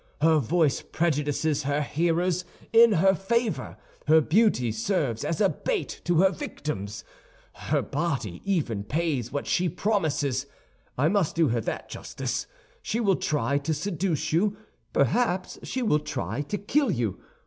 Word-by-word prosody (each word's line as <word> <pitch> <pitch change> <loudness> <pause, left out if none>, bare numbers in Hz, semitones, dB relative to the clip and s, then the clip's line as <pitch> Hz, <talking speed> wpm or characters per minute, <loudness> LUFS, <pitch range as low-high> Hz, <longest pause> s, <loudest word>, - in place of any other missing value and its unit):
Her 160 0 +5
voice 150 +2 +1
prejudices 150 -2 0
her 145 +1 0
hearers 170 +4 0 0.3
in 230 -1 +7
her 190 +2 +4
favor; 225 +4 -1 0.3
her 160 +1 +7
beauty 160 - +2
serves 115 - -1
as 165 - -2
a 205 - +5
bait 445 - -3
to 175 -1 +3
her 190 0 +5
victims; 105 - -5 0.5
her - - -1
body 135 - -2
even 145 - -1
pays 140 -2 -1
what 145 - -3
she 180 0 +1
promises—I 145 - -2
must 190 -2 +1
do 165 -4 +3
her 115 0 0
that - - -4
justice. - - -4 0.3
She 230 - -2
will 200 -5 +3
try 140 -3 0
to 155 +2 -1
seduce 165 -1 -2
you, 200 +5 +2 0.3
perhaps 185 - +1
she 255 - -3
will 150 -10 +3
try 150 -1 -3
to 150 +8 -3
kill 270 +8 +1
you. 115 -7 -1
160 Hz, 145 wpm, -26 LUFS, 140-195 Hz, 0.5 s, in